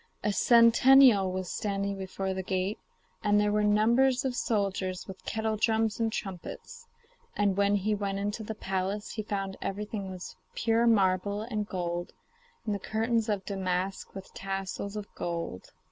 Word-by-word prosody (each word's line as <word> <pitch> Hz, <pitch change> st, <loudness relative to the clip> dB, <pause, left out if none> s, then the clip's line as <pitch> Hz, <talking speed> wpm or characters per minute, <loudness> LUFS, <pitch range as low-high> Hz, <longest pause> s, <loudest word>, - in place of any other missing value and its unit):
A 210 Hz, -, +1 dB
sentinel 235 Hz, -2 st, +6 dB
was 185 Hz, -1 st, -4 dB
standing 200 Hz, -1 st, -2 dB
before 190 Hz, 0 st, -3 dB
the 190 Hz, -, -3 dB
gate, 190 Hz, +2 st, -2 dB, 0.4 s
and 205 Hz, 0 st, +4 dB
there 210 Hz, 0 st, +2 dB
were 210 Hz, 0 st, +2 dB
numbers 235 Hz, +6 st, +3 dB
of 255 Hz, -2 st, -1 dB
soldiers 195 Hz, -5 st, -1 dB
with 190 Hz, -1 st, -10 dB
kettledrums 220 Hz, 0 st, 0 dB
and 225 Hz, -1 st, +1 dB
trumpets. 215 Hz, -, -7 dB, 0.5 s
And 205 Hz, -2 st, +2 dB
when 200 Hz, +1 st, +3 dB
he 205 Hz, +2 st, 0 dB
went 200 Hz, -1 st, -2 dB
into 205 Hz, +2 st, -2 dB
the 220 Hz, 0 st, -5 dB
palace, 195 Hz, +1 st, -3 dB
he 220 Hz, -, -3 dB
found 195 Hz, -2 st, -3 dB
everything 205 Hz, 0 st, -4 dB
was 185 Hz, -1 st, -8 dB
of -, -, -35 dB
pure 230 Hz, +1 st, +2 dB
marble 200 Hz, -1 st, +2 dB
and 215 Hz, -3 st, -3 dB
gold, 175 Hz, -2 st, -3 dB, 0.5 s
and 215 Hz, -, 0 dB
the 200 Hz, -, -2 dB
curtains 225 Hz, +2 st, 0 dB
of 200 Hz, -2 st, -1 dB
damask 190 Hz, -1 st, -2 dB
with 195 Hz, -1 st, -9 dB
tassels 195 Hz, +1 st, -4 dB
of 210 Hz, -1 st, -4 dB
gold. 170 Hz, -, -5 dB
205 Hz, 160 wpm, -29 LUFS, 190-220 Hz, 0.5 s, sentinel